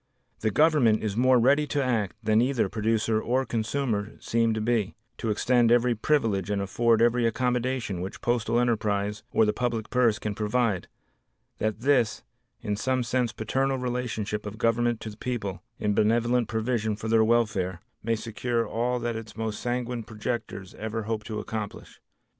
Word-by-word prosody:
The 110 Hz, -, +1 dB
Government 130 Hz, -4 st, +3 dB
is 105 Hz, -2 st, -2 dB
more 130 Hz, +2 st, +4 dB
ready 140 Hz, +5 st, +3 dB
to 145 Hz, 0 st, 0 dB
act 110 Hz, -7 st, 0 dB
than 110 Hz, +1 st, +3 dB
either 125 Hz, -4 st, +1 dB
producer 110 Hz, +1 st, 0 dB
or 130 Hz, +3 st, 0 dB
consumer 115 Hz, -2 st, -1 dB
seem 115 Hz, 0 st, +1 dB
to -, -, -1 dB
be; 110 Hz, -3 st, 0 dB, 0.2 s
to 115 Hz, -, -2 dB
extend 120 Hz, +2 st, +3 dB
every 120 Hz, 0 st, +4 dB
privilege 110 Hz, -6 st, +1 dB
and 100 Hz, -1 st, 0 dB
afford 115 Hz, +3 st, +2 dB
every 120 Hz, 0 st, +3 dB
accommodation 125 Hz, -4 st, -1 dB
which 95 Hz, +2 st, -6 dB
postal 120 Hz, -1 st, +1 dB
enterprise 105 Hz, -3 st, 0 dB
or 110 Hz, -, +4 dB
the 105 Hz, -, +1 dB
public 115 Hz, -3 st, -2 dB
purse 120 Hz, -4 st, +3 dB
can 105 Hz, -, -3 dB
provide, 105 Hz, -2 st, 0 dB, 0.7 s
that 110 Hz, 0 st, -1 dB
this, 120 Hz, -6 st, +2 dB, 0.4 s
in 105 Hz, -3 st, -2 dB
some 130 Hz, +3 st, 0 dB
sense 120 Hz, -1 st, 0 dB
paternal 135 Hz, +4 st, -1 dB
relation 125 Hz, -3 st, -2 dB, 0.2 s
of 105 Hz, +1 st, -7 dB
government 115 Hz, 0 st, +1 dB
to 110 Hz, -2 st, -7 dB
people 100 Hz, -6 st, -4 dB, 0.2 s
in 105 Hz, -1 st, 0 dB
benevolent 120 Hz, +3 st, +2 dB
provision 110 Hz, -1 st, -1 dB
for 110 Hz, +1 st, -6 dB
their 110 Hz, 0 st, +4 dB
welfare, 105 Hz, -6 st, +1 dB, 0.2 s
may 115 Hz, +1 st, 0 dB
secure 115 Hz, +1 st, -2 dB
all 120 Hz, +2 st, 0 dB
that 120 Hz, -1 st, -2 dB
its 110 Hz, -1 st, -8 dB
most 110 Hz, -1 st, -3 dB
sanguine 125 Hz, 0 st, -2 dB
projectors 110 Hz, -3 st, -5 dB
ever 110 Hz, +1 st, -3 dB
hoped 110 Hz, 0 st, -3 dB
to 110 Hz, -2 st, -3 dB
accomplish. 110 Hz, -2 st, -6 dB
115 Hz, 165 wpm, -27 LUFS, 105-125 Hz, 0.7 s, more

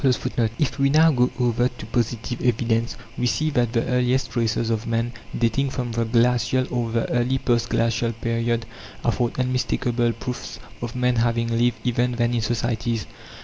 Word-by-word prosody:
(3) 130 Hz, -2 st, +1 dB, 0.3 s
If 145 Hz, -3 st, -1 dB
we 140 Hz, 0 st, +4 dB
now 160 Hz, +3 st, +6 dB
go 125 Hz, -2 st, +3 dB
over 120 Hz, 0 st, +2 dB
to -, -, -10 dB
positive 120 Hz, 0 st, -2 dB
evidence, 115 Hz, -1 st, +1 dB, 0.2 s
we 125 Hz, -, +2 dB
see 155 Hz, +5 st, 0 dB
that 120 Hz, -5 st, +1 dB
the 115 Hz, -, +1 dB
earliest 125 Hz, +1 st, +1 dB
traces 115 Hz, -1 st, 0 dB
of 110 Hz, 0 st, -2 dB
man, 115 Hz, +1 st, -1 dB, 0.2 s
dating 120 Hz, +4 st, +1 dB
from 125 Hz, -3 st, -3 dB
the 115 Hz, 0 st, 0 dB
glacial 125 Hz, +2 st, +2 dB
or 120 Hz, -2 st, 0 dB
the 115 Hz, 0 st, 0 dB
early 125 Hz, +2 st, +1 dB
post 120 Hz, -2 st, 0 dB
glacial 115 Hz, 0 st, +1 dB
period, 115 Hz, +1 st, -1 dB, 0.4 s
afford 120 Hz, +1 st, 0 dB
unmistakable 125 Hz, -2 st, 0 dB
proofs 125 Hz, +2 st, -6 dB, 0.2 s
of 120 Hz, +1 st, -5 dB
man 125 Hz, -1 st, +1 dB
having 115 Hz, 0 st, +1 dB
lived 120 Hz, +1 st, +2 dB
even 125 Hz, 0 st, +1 dB
then 120 Hz, 0 st, +1 dB
in 120 Hz, -, +1 dB
societies. 115 Hz, 0 st, -1 dB
120 Hz, 170 wpm, -23 LUFS, 115-125 Hz, 0.4 s, now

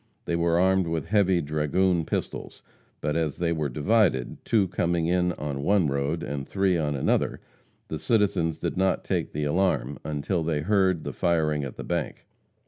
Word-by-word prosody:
They 85 Hz, -, -1 dB
were 85 Hz, 0 st, +2 dB
armed 95 Hz, -1 st, +3 dB
with 80 Hz, -3 st, -2 dB
heavy 95 Hz, -2 st, +2 dB
dragoon 80 Hz, +4 st, +1 dB
pistols, -, -, -4 dB, 0.4 s
but 75 Hz, -, -1 dB
as 80 Hz, -3 st, -1 dB
they 85 Hz, -1 st, 0 dB
were 80 Hz, -3 st, -1 dB
divided, 80 Hz, -, +1 dB
two 105 Hz, -4 st, +2 dB
coming 85 Hz, -2 st, 0 dB
in 90 Hz, +1 st, +2 dB
on 70 Hz, -3 st, -4 dB
one 95 Hz, -1 st, +2 dB
road 70 Hz, +4 st, -1 dB
and 70 Hz, -4 st, -4 dB
three 95 Hz, -2 st, +1 dB
on 75 Hz, -3 st, 0 dB
another, 65 Hz, -, 0 dB, 0.5 s
the 80 Hz, -, -4 dB
citizens 85 Hz, -3 st, +1 dB
did -, -, -3 dB
not 95 Hz, 0 st, +1 dB
take -, -, -2 dB
the 75 Hz, -, -3 dB
alarm 75 Hz, -4 st, 0 dB
until 75 Hz, +4 st, -2 dB
they 80 Hz, -2 st, -1 dB
heard, 95 Hz, -2 st, +2 dB
the -, -, -5 dB
firing 80 Hz, -4 st, +1 dB
at 70 Hz, -, -6 dB
the -, -, -5 dB
bank. -, -, -3 dB
85 Hz, 175 wpm, -26 LUFS, 75-95 Hz, 0.5 s, armed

